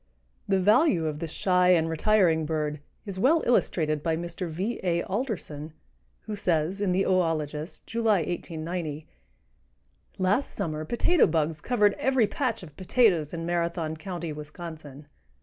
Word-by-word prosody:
The 195 -1 +2
value 210 - +4
of 150 -1 -3
this 165 -1 -4
shy 180 +2 +3
and 165 -2 +2
retiring 165 -2 +2
bird 150 -1 -2 0.3
is 195 -3 -6
well 310 - +4
illustrated 155 -10 +1
by 160 0 0
Mr. 170 +1 -4
V. 190 +9 -3
A. 170 -2 0
Alderson, 180 - -4 0.5
who 215 - -5
says 180 -1 0
in 200 -3 +1
the 190 +2 +2
"Oologist" 165 -4 -1
(July, 225 -5 +2
1890): 160 -2 -4 1.1
"Last 200 +9 0
summer 155 -1 -3
potato 310 - +3
bugs 155 -1 0
covered 210 -2 +3
every 260 -4 +3
patch 230 0 -2
of 150 -5 -12
potatoes 185 - +2
in 165 -1 -4
Marathon 170 -2 -1
County, 170 -1 -5
Wisconsin. 150 -1 -9
170 Hz, 140 wpm, -27 LUFS, 155-200 Hz, 1.1 s, value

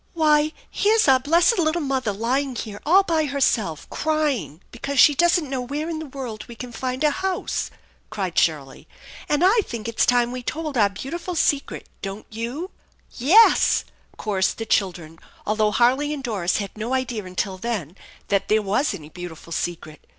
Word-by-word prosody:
"Why, 305 -1 +3 0.2
here's 430 -1 +3
our 265 -1 +6
blessed 340 - +3
little 320 +1 +1
mother 265 -5 -1
lying 250 +6 -1
here 210 -3 -6
all 380 +5 +6
by 325 -4 +1
herself, 235 - 0
crying 285 - -1
because 275 +4 -5
she 295 - +8
doesn't 340 +1 +2
know 265 -1 -3
where 290 +5 -4
in 315 - -4
the 315 - -6
world 250 -6 -6
we 235 - -10
can 245 +1 -8
find 255 +3 -3
a 300 - +4
house! 375 +2 -2 0.2
" - - -36
cried 190 -5 -4
Shirley; 145 -5 0 0.2
" - - -15
and 295 +3 +2
I 425 +5 +5
think 230 -7 -6
it's 230 - +1
time 245 -1 +3
we 255 0 -5
told 305 +3 -4
our 210 -4 +4
beautiful 335 - -6
secret, 290 -3 0
don't 195 +2 -6
you? 240 - -5
" - - -38
" - - -35 0.2
Yes," 445 +6 +6 0.3
chorused 195 -3 0
the 225 - -4
children, 175 -6 -1 0.3
although 215 0 +2
Harley 255 +7 +2
and 275 - -8
Doris 200 -8 0
had 200 -2 -5
no 225 +4 -2
idea 245 -5 -2
until 185 +1 -3
then 190 -8 -4 0.3
that 200 -1 +1
there 215 0 +2
was 205 +5 0
any 155 -5 -11
beautiful 170 -1 -9
secret. 160 -3 -4
245 Hz, 185 wpm, -23 LUFS, 205-300 Hz, 0.3 s, she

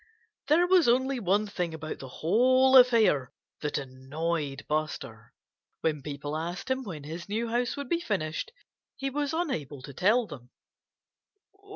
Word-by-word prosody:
There 330 +4 +5
was 355 -4 +4
only 260 +2 +2
one 205 +1 +2
thing 180 -5 -3
about 155 0 -6
the 135 - -8
whole 255 - +4
affair 230 - +5 0.3
that 150 - -2
annoyed 140 +2 -3
Buster: 150 -8 -3 0.5
when 155 -3 0
people 145 +1 -5
asked 175 +9 -4
him 260 0 0
when 175 - -7
his 165 +6 -7
new 225 +3 -1
house 240 +3 0
would 280 -2 -5
be 335 +5 +1
finished 190 - -2 0.4
he 275 0 -3
was 290 +1 -1
unable 160 - -3
to 140 - -9
tell 215 - +3
them. 125 - -11
180 Hz, 150 wpm, -28 LUFS, -, 0.5 s, There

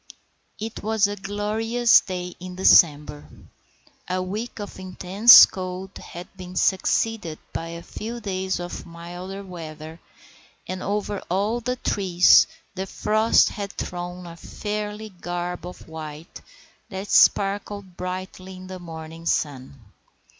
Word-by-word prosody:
It 220 +1 -5
was 220 0 +2
a 205 0 -2
glorious 215 +4 +2
day 180 -1 -5
in 180 0 -8
December. 150 -5 +4 0.8
A 185 0 0
week 210 +6 -4
of 205 -2 -7
intense 190 +4 +8
cold 185 +1 -6
had 175 +1 -9
been 185 -1 -9
succeeded 190 -2 +1 0.2
by 165 - -4
a 170 0 -8
few 230 +2 -6
days 190 -3 -2
of 175 0 -6
milder 175 +4 -8
weather, 160 -3 -9 0.7
and 185 0 -4
over 205 0 -2
all 205 +6 0
the 250 +1 -2
trees 185 -7 +5 0.3
the 190 0 -4
frost 215 +3 +3
had 200 -1 -6
thrown 180 0 -6
a 170 -1 -9
fairy 210 +3 -5
garb 175 -1 -5
of 180 - -11
white 155 0 -9 0.5
that 195 0 -6
sparkled 200 -1 +3
brightly 185 +1 -6
in 185 0 -10
the 185 0 -8
morning 165 -1 -9
sun. 140 -3 -2
185 Hz, 125 wpm, -24 LUFS, 175-205 Hz, 0.8 s, intense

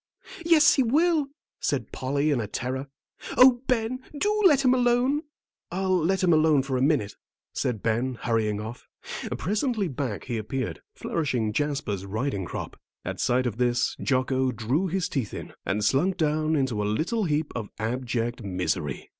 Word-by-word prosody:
"Yes, 330 -2 +6
he 275 - +3
will," 305 +4 +3 0.3
said - - -1
Polly, 140 +3 0
in 130 -5 +1
a 105 - -4
terror. 130 +6 -3 0.5
"Oh, 250 -1 +7
Ben, 250 0 0 0.2
do 420 +6 +1
let 280 -5 +3
him 255 - +6
alone." 250 +3 +2 0.5
"I'll 185 +1 +1
let 185 +3 +1
him 175 -2 +5
alone 155 -3 +4
for 135 -1 -2
a 125 - 0
minute," 135 -8 +1 0.4
said 115 -5 -2
Ben, 120 +3 0
hurrying 110 -3 0
off. 110 +3 -8 0.5
Presently 210 - 0
back 130 -7 -3
he 120 -3 -3
appeared, 110 -5 -4
flourishing 125 -9 -1
Jasper's 135 -8 -1
riding 105 0 -2
crop. - - -6 0.3
At - - -4
sight 125 +1 +2
of 115 -3 -2
this 120 -1 +1
Jocko 130 -1 +1
drew 125 - 0
his 185 0 -1
teeth 125 - -3
in, - - -7
and 100 +3 0
slunk 180 - +2
down 155 -1 +1
into 130 -7 0
a - - -1
little 170 - 0
heap 150 -1 0
of 110 -4 -4
abject 120 +1 -2
misery. 90 - -2
135 Hz, 165 wpm, -26 LUFS, 115-190 Hz, 0.5 s, Oh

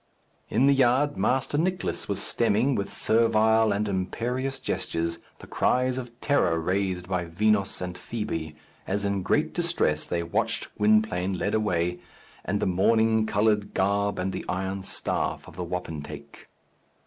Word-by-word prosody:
In 120 +5 +3
the 140 - +6
yard, 135 +2 +3
Master 135 +3 +1
Nicless 180 +2 -1
was - - -1
stemming, 115 +4 +2
with 100 -5 -2
servile 110 -1 +3
and 105 +1 0
imperious 120 +8 -2
gestures, 85 0 -2 0.2
the - - -12
cries 125 0 +1
of 120 -1 -9
terror 90 - +2
raised 90 +1 -1
by 90 -2 -1
Vinos 100 +4 +1
and 90 -1 -5
Fibi, 80 -9 -4 0.3
as 100 +1 -1
in 100 -1 0
great 150 +11 +1
distress 170 - 0
they 85 -1 -1
watched 85 - -2
Gwynplaine 105 -3 +2
led 105 - -1
away, 90 -5 0 0.4
and 100 +2 -1
the - - 0
mourning 110 +4 +3
coloured 105 0 +1
garb 100 +1 +1
and 95 +1 -2
the - - -4
iron 95 +1 -2
staff 95 - -3
of - - -12
the 90 - -4
wapentake. 75 -5 -7
100 Hz, 150 wpm, -26 LUFS, 90-115 Hz, 0.4 s, the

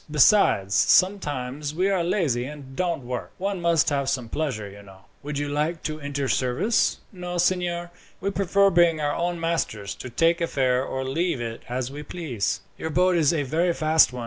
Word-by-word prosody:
Besides, 150 - +4
sometimes 145 - +2
we 185 +3 +2
are 190 -3 +1
lazy 155 - 0
and 135 -2 -9
don't 170 -5 -1
work. 125 0 -5
One 195 -1 -2
must 170 -2 +3
have 140 -2 0
some 125 -4 -2
pleasure, 125 -10 -2
you 100 +1 -12
know." 95 -1 -15 0.2
"Would 145 0 -5
you 145 0 -2
like 150 +3 -1
to 155 -1 -3
enter 140 -1 -3
service?" 130 - +1
"No, 180 -2 -5
signor. 175 -1 0 0.3
We 195 +2 -2
prefer 195 0 +3
being 170 -2 +4
our 145 -1 0
own 175 0 -2
masters; 160 -12 -2
to 130 - -8
take 165 +8 +2
a 170 - +1
fare 130 -3 +1
or 130 0 -3
leave 160 +2 -1
it 115 -1 -5
as 125 +1 -3
we 145 +1 -7
please." 150 - -3 0.2
"Your 160 - -3
boat 180 +3 +3
is 160 -4 +3
a 160 -4 0
very 165 +5 0
fast 155 -1 +4
one. 125 - -7
155 Hz, 195 wpm, -25 LUFS, 130-175 Hz, 0.3 s, Besides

